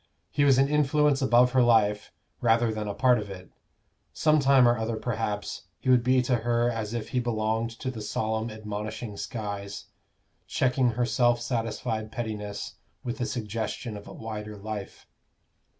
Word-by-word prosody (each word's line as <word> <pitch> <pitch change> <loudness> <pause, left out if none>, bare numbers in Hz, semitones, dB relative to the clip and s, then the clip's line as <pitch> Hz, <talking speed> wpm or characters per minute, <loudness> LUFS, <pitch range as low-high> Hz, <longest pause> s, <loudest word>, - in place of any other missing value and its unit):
He 145 - +2
was 135 -2 +5
an 135 +1 +4
influence 150 -1 +2
above 125 -1 +5
her 130 0 +4
life, 110 -3 +3 0.3
rather 115 -1 +3
than 105 -1 -4
a 100 - -2
part 125 0 +4
of 105 -1 -6
it; 95 -1 -10 0.6
some 155 -1 +3
time 135 -3 +5
or 120 - +4
other, 110 0 -2
perhaps, 110 -2 -3
he 130 - +1
would 125 -2 +5
be 130 0 +3
to 125 0 +2
her 120 +1 +1
as 110 -1 -4
if 115 - -4
he 125 - 0
belonged 110 -1 0
to 130 +2 -3
the 115 -4 -7
solemn 110 +2 -2
admonishing 110 0 -5
skies, 100 -2 -5 0.6
checking 130 -1 +2
her 120 +2 +1
self 120 -1 +2
satisfied 115 -2 -2
pettiness 105 -3 -5 0.3
with 120 +1 -4
the 120 - -1
suggestion 110 0 -4
of 105 - -9
a - - -9
wider 105 -1 -6
life. 105 -1 -7
115 Hz, 165 wpm, -27 LUFS, 105-125 Hz, 0.6 s, was